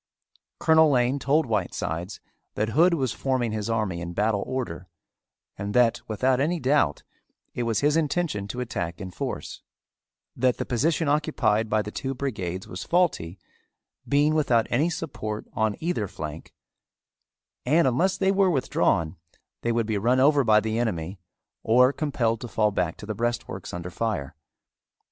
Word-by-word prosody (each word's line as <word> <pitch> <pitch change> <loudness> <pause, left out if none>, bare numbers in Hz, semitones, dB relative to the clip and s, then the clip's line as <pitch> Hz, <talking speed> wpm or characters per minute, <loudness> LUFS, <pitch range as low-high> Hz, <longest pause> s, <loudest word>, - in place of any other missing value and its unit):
Colonel 160 -1 +5
Lane 130 0 +2
told 145 +4 +2
Whitesides 95 -4 -3 0.4
that 110 +1 0
Hood 170 +8 +4
was 130 -6 -1
forming 130 -4 -1
his 110 0 -3
army 105 -6 -1
in 85 0 -5
battle 105 +1 +1
order 105 -9 -4 0.7
and 100 +1 -4
that 120 -1 +4
without 125 +4 +1
any 170 +4 0
doubt 135 - +1 0.5
it - - -3
was 115 - +1
his 145 +1 +3
intention 155 - 0
to 125 +4 -4
attack 85 -8 -4
in 95 -3 -6
force; - - -5 0.7
that 125 0 +2
the - - -3
position 155 +6 0
occupied 145 -7 +1
by 110 0 +1
the 105 - -7
two 135 +3 -4
brigades 95 -9 -4
was 90 0 -6
faulty, 155 - 0 0.7
being 145 +2 +3
without 125 -8 +2
any 145 +8 +2
support 130 -10 -5
on 110 -1 0
either 165 - -1
flank, 75 -2 -8 1.1
and 155 +4 +3
unless 170 +10 +1
they 190 - +2
were 195 -1 +3
withdrawn 95 - +1 0.4
they 120 - 0
would 115 -1 +1
be 105 -2 -1
run 125 +5 +2
over 140 +1 +5
by 110 -2 +5
the 110 +1 -2
enemy 95 -5 -2 0.4
or 125 +4 +4
compelled 125 -8 -1
to 120 - -5
fall 110 -2 +1
back 90 -4 -1
to - - -9
the 110 - -3
breastworks 115 -4 -3
under 85 +1 -6
fire. 85 -9 -3
115 Hz, 160 wpm, -25 LUFS, 105-140 Hz, 1.1 s, Colonel